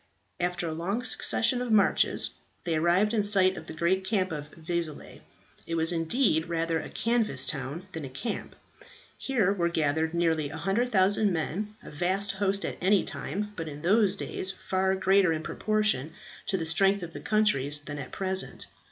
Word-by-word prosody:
After 175 Hz, -1 st, -1 dB
a -, -, -3 dB
long 195 Hz, +9 st, -2 dB
succession 250 Hz, 0 st, +2 dB
of 250 Hz, -2 st, -3 dB
marches 210 Hz, -2 st, +3 dB, 0.3 s
they 170 Hz, -, -1 dB
arrived 175 Hz, +7 st, +2 dB
in 220 Hz, -, +2 dB
sight 190 Hz, -2 st, +4 dB
of 160 Hz, -, -9 dB
the -, -, -7 dB
great 170 Hz, +4 st, 0 dB
camp 190 Hz, -3 st, -1 dB
at 150 Hz, -1 st, -6 dB
Vezelay. 165 Hz, -2 st, -5 dB, 0.5 s
It 165 Hz, -, -2 dB
was 165 Hz, +1 st, +4 dB
indeed 165 Hz, -, +1 dB
rather 165 Hz, -1 st, 0 dB
a -, -, -7 dB
canvas 225 Hz, -, +1 dB
town 140 Hz, +5 st, -3 dB
than 160 Hz, -, -6 dB
a 135 Hz, -, -6 dB
camp. 135 Hz, -, -5 dB, 0.6 s
Here 220 Hz, -8 st, +1 dB
were 170 Hz, -4 st, 0 dB
gathered 160 Hz, 0 st, 0 dB
nearly 160 Hz, -3 st, +1 dB
100,000 195 Hz, -, +2 dB
men, 185 Hz, +6 st, -3 dB
a -, -, -10 dB
vast 185 Hz, +6 st, +2 dB
host 195 Hz, 0 st, 0 dB
at -, -, -5 dB
any 195 Hz, +2 st, +3 dB
time, 210 Hz, +1 st, -4 dB
but 165 Hz, -3 st, -5 dB
in 150 Hz, 0 st, -8 dB
those 200 Hz, +2 st, +4 dB
days 190 Hz, -1 st, -2 dB
far 190 Hz, 0 st, -1 dB
greater 190 Hz, -1 st, +3 dB
in 160 Hz, 0 st, -2 dB
proportion 215 Hz, -10 st, 0 dB, 0.3 s
to 190 Hz, -, +1 dB
the 165 Hz, -, -3 dB
strength 195 Hz, +4 st, +2 dB
of 165 Hz, -1 st, -7 dB
the -, -, -7 dB
countries 175 Hz, -10 st, +2 dB
than 145 Hz, 0 st, -7 dB
at 130 Hz, -, -7 dB
present. 190 Hz, 0 st, -2 dB
185 Hz, 175 wpm, -28 LUFS, 160-200 Hz, 0.6 s, sight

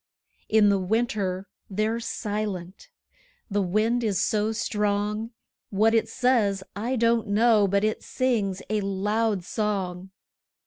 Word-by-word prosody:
In 215 Hz, -1 st, +5 dB
the 200 Hz, -1 st, +3 dB
winter 200 Hz, -2 st, -1 dB, 0.2 s
they're 215 Hz, +3 st, 0 dB
silent 205 Hz, -, -4 dB, 0.6 s
the 205 Hz, +1 st, +1 dB
wind 215 Hz, +6 st, +1 dB
is 205 Hz, -5 st, 0 dB
so 215 Hz, -1 st, +1 dB
strong; 210 Hz, -1 st, -1 dB, 0.4 s
What 215 Hz, +3 st, +3 dB
it 225 Hz, -, +2 dB
says, 220 Hz, -7 st, +1 dB
I 235 Hz, +6 st, -2 dB
don't 230 Hz, -1 st, +2 dB
know, 215 Hz, 0 st, +4 dB
but 200 Hz, +1 st, +1 dB
it 215 Hz, 0 st, 0 dB
sings 215 Hz, -7 st, -1 dB
a 215 Hz, -1 st, 0 dB
loud 205 Hz, +1 st, 0 dB
song. 190 Hz, -3 st, -2 dB
210 Hz, 125 wpm, -26 LUFS, 195-225 Hz, 0.6 s, In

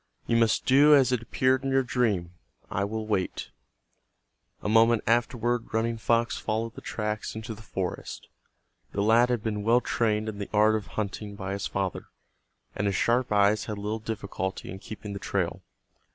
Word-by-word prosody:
"You 115 Hz, -, +1 dB
must 115 Hz, -1 st, +3 dB
do 145 Hz, +3 st, +7 dB
as 130 Hz, -2 st, +4 dB
it 125 Hz, -3 st, +1 dB
appeared 130 Hz, +3 st, +1 dB
in 135 Hz, -, -1 dB
your 135 Hz, 0 st, +3 dB
dream. 105 Hz, -9 st, 0 dB, 0.4 s
I 100 Hz, -, 0 dB
will 110 Hz, +2 st, -3 dB
wait." 100 Hz, -4 st, -2 dB, 1.1 s
A -, -, -2 dB
moment 115 Hz, +1 st, +4 dB
afterward 120 Hz, 0 st, 0 dB
Running 115 Hz, 0 st, 0 dB
Fox 115 Hz, +1 st, +1 dB
followed 110 Hz, +1 st, -2 dB
the -, -, -10 dB
tracks 105 Hz, -1 st, -3 dB
into 110 Hz, +1 st, -5 dB
the 110 Hz, -, -12 dB
forest. 95 Hz, -4 st, -5 dB, 0.7 s
The 100 Hz, -, 0 dB
lad 115 Hz, +3 st, +5 dB
had 120 Hz, -4 st, 0 dB
been 105 Hz, -2 st, -2 dB
well 115 Hz, +4 st, +4 dB
trained 110 Hz, -3 st, 0 dB
in 105 Hz, -2 st, -5 dB
the 100 Hz, -, -5 dB
art 110 Hz, +1 st, +4 dB
of 110 Hz, -2 st, -2 dB
hunting 105 Hz, 0 st, -3 dB
by 95 Hz, -1 st, -4 dB
his 100 Hz, -, -3 dB
father, 95 Hz, -2 st, -3 dB, 0.7 s
and 105 Hz, -, 0 dB
his 100 Hz, -, 0 dB
sharp 120 Hz, +3 st, +1 dB
eyes 105 Hz, +1 st, +3 dB
had 105 Hz, -, -4 dB
little 105 Hz, +2 st, -3 dB
difficulty 100 Hz, -4 st, -4 dB
in 95 Hz, -, -7 dB
keeping 105 Hz, 0 st, -8 dB
the 100 Hz, -, -5 dB
trail. -, -, -2 dB
110 Hz, 180 wpm, -27 LUFS, 105-115 Hz, 1.1 s, do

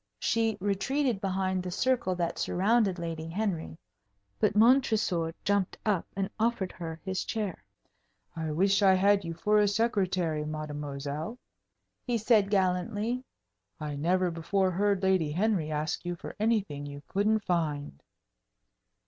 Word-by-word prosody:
She 225 Hz, -1 st, +1 dB
retreated 205 Hz, +4 st, 0 dB
behind 190 Hz, -1 st, 0 dB
the 180 Hz, -, -5 dB
circle 235 Hz, -1 st, +1 dB
that 170 Hz, -1 st, -2 dB
surrounded 200 Hz, 0 st, +2 dB
Lady 165 Hz, -2 st, -4 dB
Henry. 170 Hz, -, -2 dB, 0.6 s
But -, -, +2 dB
Montresor 215 Hz, -8 st, +3 dB
jumped 200 Hz, -2 st, 0 dB
up 205 Hz, -5 st, +1 dB
and 195 Hz, 0 st, -1 dB
offered 225 Hz, -4 st, 0 dB
her 165 Hz, -2 st, -7 dB
his 190 Hz, -1 st, -1 dB
chair. 210 Hz, -, -3 dB, 0.7 s
"I 160 Hz, -1 st, -3 dB
wish 195 Hz, +6 st, +2 dB
I 190 Hz, -2 st, +6 dB
had 200 Hz, +1 st, +4 dB
you 165 Hz, -1 st, -5 dB
for 210 Hz, +4 st, +2 dB
a 205 Hz, -, +4 dB
secretary, 185 Hz, -7 st, 0 dB
mademoiselle," 150 Hz, -, -5 dB, 0.7 s
he 245 Hz, -2 st, 0 dB
said, 215 Hz, -2 st, +3 dB
gallantly. 205 Hz, +5 st, 0 dB, 0.6 s
"I 150 Hz, -2 st, -4 dB
never 180 Hz, +4 st, +1 dB
before 185 Hz, +3 st, 0 dB
heard 200 Hz, +1 st, +1 dB
Lady 185 Hz, -5 st, +2 dB
Henry 185 Hz, -3 st, +1 dB
ask 155 Hz, +1 st, -2 dB
you 175 Hz, 0 st, -3 dB
for -, -, -9 dB
anything 200 Hz, -10 st, 0 dB
you 145 Hz, 0 st, -8 dB
couldn't 210 Hz, +2 st, +1 dB
find." 150 Hz, -, -1 dB
190 Hz, 135 wpm, -29 LUFS, 165-210 Hz, 0.7 s, I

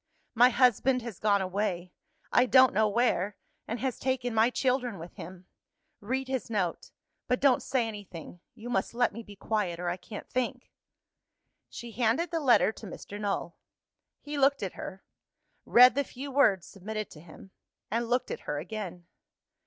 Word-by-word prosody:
My 245 Hz, +2 st, +6 dB
husband 250 Hz, 0 st, +3 dB
has 230 Hz, -6 st, -7 dB
gone 200 Hz, -2 st, +2 dB
away 185 Hz, -2 st, -2 dB, 0.4 s
I 245 Hz, -, +4 dB
don't 260 Hz, 0 st, +6 dB
know 215 Hz, +2 st, +3 dB
where 205 Hz, -3 st, +1 dB, 0.3 s
and 230 Hz, +2 st, -3 dB
has 260 Hz, -2 st, -2 dB
taken 255 Hz, -2 st, -1 dB
my 225 Hz, +2 st, +4 dB
children 250 Hz, -4 st, 0 dB
with 170 Hz, +1 st, -10 dB
him. 180 Hz, +2 st, -10 dB, 0.5 s
Read 260 Hz, +5 st, -3 dB
his 260 Hz, -5 st, -3 dB
note: 190 Hz, -6 st, -2 dB, 0.4 s
but 250 Hz, -, +1 dB
don't 270 Hz, -3 st, +4 dB
say 245 Hz, -4 st, 0 dB
anything. 190 Hz, -5 st, -9 dB, 0.2 s
You 235 Hz, 0 st, -10 dB
must 195 Hz, +1 st, -1 dB
let 245 Hz, 0 st, +2 dB
me 230 Hz, -, -7 dB
be 205 Hz, -2 st, -13 dB
quiet, 195 Hz, -4 st, -2 dB
or 175 Hz, 0 st, -2 dB
I 175 Hz, -, -2 dB
can't 205 Hz, +3 st, -9 dB
think." 255 Hz, 0 st, -3 dB, 1.0 s
She 235 Hz, -1 st, -8 dB
handed 240 Hz, -, +1 dB
the 330 Hz, -, 0 dB
letter 255 Hz, -6 st, +4 dB
to 220 Hz, -, -11 dB
Mr. 205 Hz, +3 st, -8 dB
Null. 200 Hz, -4 st, -2 dB, 0.6 s
He 290 Hz, 0 st, -5 dB
looked 275 Hz, -2 st, +3 dB
at 190 Hz, -, -3 dB
her 190 Hz, 0 st, -8 dB, 0.6 s
read 250 Hz, +1 st, +8 dB
the 280 Hz, -, +1 dB
few 275 Hz, +2 st, -8 dB
words 210 Hz, -10 st, +3 dB
submitted 215 Hz, +2 st, -6 dB
to 150 Hz, -, -12 dB
him 175 Hz, +3 st, -14 dB, 0.4 s
and 230 Hz, +1 st, -1 dB
looked 250 Hz, +1 st, 0 dB
at -, -, -4 dB
her 145 Hz, -, -1 dB
again. 180 Hz, +1 st, -6 dB
225 Hz, 170 wpm, -29 LUFS, 195-250 Hz, 1.0 s, read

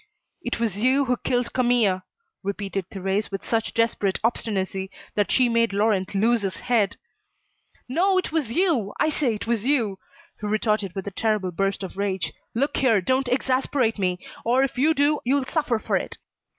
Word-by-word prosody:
"It 245 Hz, -7 st, -3 dB
was 220 Hz, -4 st, -1 dB
you 260 Hz, +4 st, +3 dB
who 250 Hz, -1 st, +2 dB
killed 245 Hz, 0 st, -1 dB
Camille," 240 Hz, -7 st, +3 dB, 0.4 s
repeated 195 Hz, -1 st, -3 dB
Thérèse 195 Hz, +2 st, -2 dB
with 195 Hz, -1 st, -5 dB
such 225 Hz, -1 st, 0 dB
desperate 230 Hz, -4 st, +1 dB
obstinacy 195 Hz, -4 st, -1 dB, 0.2 s
that 205 Hz, -1 st, +1 dB
she 255 Hz, -2 st, +4 dB
made 230 Hz, -2 st, +2 dB
Laurent 200 Hz, -2 st, +1 dB
lose 225 Hz, +3 st, +3 dB
his 195 Hz, -2 st, -2 dB
head. 220 Hz, -5 st, +1 dB, 0.9 s
"No, 370 Hz, +9 st, +2 dB
it 370 Hz, -, -1 dB
was 305 Hz, -8 st, -1 dB
you, 285 Hz, -, +1 dB
I 310 Hz, -, +3 dB
say 275 Hz, -7 st, 0 dB
it 205 Hz, -, -6 dB
was 230 Hz, -2 st, 0 dB
you," 230 Hz, -8 st, +1 dB, 0.4 s
he 210 Hz, -, -4 dB
retorted 210 Hz, -3 st, 0 dB
with 195 Hz, -, -4 dB
a 200 Hz, -, -4 dB
terrible 210 Hz, -2 st, 0 dB
burst 195 Hz, +2 st, -1 dB
of 190 Hz, -, -7 dB
rage. 190 Hz, -5 st, -1 dB, 0.2 s
"Look 275 Hz, +5 st, 0 dB
here, 230 Hz, -6 st, +4 dB
don't 260 Hz, +7 st, +1 dB
exasperate 255 Hz, -2 st, +1 dB
me, 180 Hz, -2 st, +1 dB, 0.3 s
or 250 Hz, +3 st, +3 dB
if 275 Hz, -, -1 dB
you 305 Hz, +5 st, +3 dB
do 290 Hz, +1 st, +3 dB
you'll 270 Hz, +2 st, +1 dB
suffer 295 Hz, -5 st, 0 dB
for -, -, 0 dB
it. -, -, -5 dB
225 Hz, 175 wpm, -24 LUFS, 195-255 Hz, 0.9 s, she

